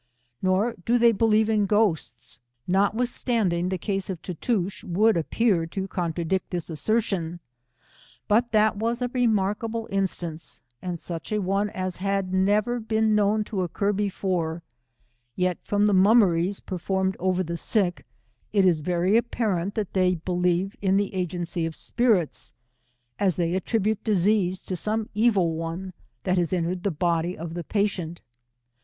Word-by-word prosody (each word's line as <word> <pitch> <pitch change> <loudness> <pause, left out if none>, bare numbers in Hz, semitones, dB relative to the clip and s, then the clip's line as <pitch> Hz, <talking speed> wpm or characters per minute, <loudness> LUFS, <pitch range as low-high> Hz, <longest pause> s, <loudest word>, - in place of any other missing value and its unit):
Nor 190 +5 +2
do 240 +5 +3
they 235 0 +6
believe 220 0 +3
in 210 -2 +2
ghosts, 205 -6 0 0.3
notwithstanding 200 -2 +1
the 185 - -1
case 195 +2 -3
of 185 -3 -4
Tootoosch 190 +2 -2
would 210 +6 +3
appear 170 +1 +1
to 190 +3 -4
contradict 175 0 -2
this 175 -1 -4
assertion, 175 -2 -1 0.9
but 235 +3 +3
that 215 -1 +3
was 235 +3 -1
a 245 - -1
remarkable 225 -1 0
instance, 175 -4 -3 0.2
and 180 -2 -4
such 165 +2 -6
a 215 - +1
one 200 +2 0
as 185 -2 -4
had 195 -1 -1
never 210 +5 +2
been 220 -1 +1
known 210 +1 +2
to 205 -3 -3
occur 200 +4 0
before; 185 -5 -2 0.7
yet 180 -1 0
from 205 0 +1
the 210 - +3
mummeries 190 -2 +4
performed 190 +1 -2
over 185 0 +1
the 170 0 -4
sick, 180 0 0 0.5
it 200 -2 +3
is 175 -4 +4
very 180 +5 +1
apparent 210 -5 0
that 210 -4 -3
they 185 -1 +3
believe 180 +2 0
in 195 -1 +3
the 200 0 -1
agency 175 -2 -2
of 165 -1 -3
spirits, 220 -10 0 0.7
as 190 -4 +2
they 170 -1 0
attribute 210 +3 0
diseases 195 -2 +1
to 185 - -3
some 215 +4 -1
evil 205 -6 +3
one 165 +3 -5 0.3
that 185 0 +1
has 170 -2 0
entered 180 0 -1
the 200 - 0
body 170 +1 0
of 165 0 -6
the 175 0 -4
patient. 185 -4 -2
190 Hz, 150 wpm, -25 LUFS, 175-215 Hz, 0.9 s, they